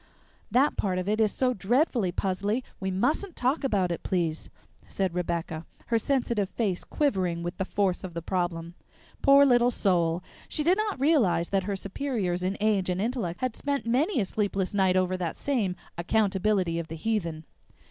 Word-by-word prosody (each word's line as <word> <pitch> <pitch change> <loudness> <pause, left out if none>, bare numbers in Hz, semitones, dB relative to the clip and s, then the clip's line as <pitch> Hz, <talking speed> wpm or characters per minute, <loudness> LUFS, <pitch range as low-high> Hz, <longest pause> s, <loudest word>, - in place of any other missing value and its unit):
"That 275 +4 +3
part 185 -3 0
of 185 +1 -2
it 215 +2 +1
is 215 -2 +3
so 255 -1 +1
dreadfully 235 - +1
puzzly 200 +7 -1 0.2
we 190 - -2
mustn't 295 - 0
talk 260 +5 0
about 195 -9 +1
it, 170 - -3
please," 165 -4 -1 0.4
said 190 -3 -1
Rebecca, 170 -2 -2 0.3
her 230 -1 +3
sensitive 235 -6 0
face 200 -6 -1
quivering 185 - 0
with 175 - -4
the 190 - -1
force 195 -2 0
of 180 -3 -7
the 170 - -3
problem. 170 -2 -2 0.5
Poor 280 0 +7
little 245 -2 +4
soul! 180 -6 +1 0.3
She 300 - 0
did 360 +6 +3
not 420 -8 -1
realize 255 - +3
that 195 -2 0
her 200 0 -1
superiors 195 -3 -2
in 185 +2 -1
age 205 -3 +1
and 180 0 -1
intellect 210 -6 -2
had 255 -3 -1
spent 280 -2 -2
many 265 - +1
a 205 - +1
sleepless 195 -2 -1
night 190 -2 +3
over 185 0 +1
that 175 -3 -3
same 225 -10 0 0.2
"accountability 190 -2 +1
of 165 - -5
the 160 - -6
heathen." 165 -4 -2
195 Hz, 180 wpm, -27 LUFS, 180-245 Hz, 0.5 s, Poor